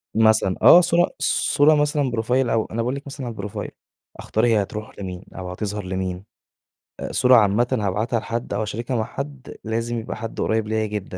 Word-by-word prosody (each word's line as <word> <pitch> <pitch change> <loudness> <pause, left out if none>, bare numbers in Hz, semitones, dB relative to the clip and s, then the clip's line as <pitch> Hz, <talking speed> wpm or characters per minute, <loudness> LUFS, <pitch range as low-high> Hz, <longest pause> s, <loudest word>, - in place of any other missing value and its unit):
مثلًا. 110 -4 +3
آه 175 - +9
صورة 175 0 +2
صورة 150 +2 +3
مثلًا 145 -2 +1
بروفايل 120 +3 0
أو 115 -1 +1
أنا - - -7
باقول 125 +3 -1
لِك 140 - -7
مثلًا 135 -3 -6
بروفايل. 105 -3 -6 0.5
أختار 110 +2 0
هي 115 -3 +3
هتروح 105 +1 -7
لمين 90 -2 -6
أو 90 -1 -6
هتظهر 105 +2 -4
لمين. 95 0 -3 0.8
أ - - -5
صورة 130 -1 +5
عامةً 110 +2 +4
هابعتها 110 +4 0
لحد 115 0 -4
أو 100 - -1
هاشاركها 115 +4 -3
مع 110 - 0
حد، 140 +3 -7
لازم 115 +1 -2
يبقى 110 - -6
حد 115 -1 -5
قريب 110 -1 0
ليّا 110 0 0
جدًا 100 -3 -5
110 Hz, 185 wpm, -22 LUFS, 105-125 Hz, 0.8 s, آه